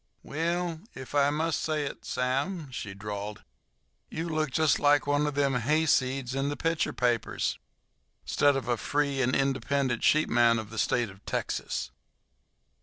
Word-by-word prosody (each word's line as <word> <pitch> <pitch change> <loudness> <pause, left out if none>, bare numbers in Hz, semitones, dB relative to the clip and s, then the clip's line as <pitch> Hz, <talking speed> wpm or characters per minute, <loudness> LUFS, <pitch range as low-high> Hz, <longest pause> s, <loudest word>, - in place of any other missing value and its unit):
"Well, 170 +1 -2
ef 130 +1 -9
I 145 -1 +4
must 155 +1 0
say 155 -2 0
it, - - -7
Sam," 135 +5 -1
she 105 -5 -6
drawled, 105 +1 -6 0.7
"you 165 +2 -4
look 155 -2 0
jest 155 +3 +2
like 145 0 +4
one 145 +1 +2
of 145 - -3
them 140 -1 +2
hayseeds 130 -1 +1
in 135 +1 0
the 145 - -3
picture 165 -1 0
papers, 120 -3 0 0.7
'stead 145 -1 +3
of 135 -3 -3
a 120 -1 +1
free 140 +2 0
and 130 0 +2
independent 135 -2 0
sheepman 120 -6 +4
of 110 -1 -5
the 110 - -4
State 120 0 +1
o' 95 - -16
Texas." - - -2
140 Hz, 155 wpm, -28 LUFS, 125-150 Hz, 0.7 s, I